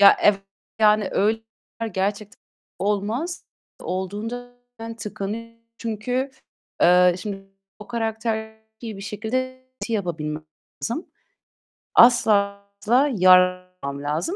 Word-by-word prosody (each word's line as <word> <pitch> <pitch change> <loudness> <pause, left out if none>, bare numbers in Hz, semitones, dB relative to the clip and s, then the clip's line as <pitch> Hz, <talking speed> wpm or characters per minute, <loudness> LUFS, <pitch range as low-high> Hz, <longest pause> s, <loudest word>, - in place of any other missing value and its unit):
Ya, 200 - +9
evet, 200 -1 +5 0.4
yani, 210 -2 +4
öy 220 +3 +2 0.5
gerçekten 200 +2 -2 0.4
olmaz. 210 - -1 0.4
Olduğunda 215 +7 -4 0.2
ben 225 0 -7
tıkanıyorum. 220 +2 -6 0.2
Çünkü, 245 +4 -2 0.5
eee, 180 0 +6
şimdi, 195 -1 -6 0.3
o 210 - -11
karakteri 220 -1 -2 0.2
bir 220 -4 -6
şekilde 255 +6 -3 0.2
ti 230 - -3
yapabilmem 155 -6 -2 0.4
lazım. 240 +9 -2 0.9
Asla 205 -4 +5 0.2
asla 230 +3 +2 0.9
lazım. 145 - -2
215 Hz, 90 wpm, -23 LUFS, 195-230 Hz, 0.9 s, Ya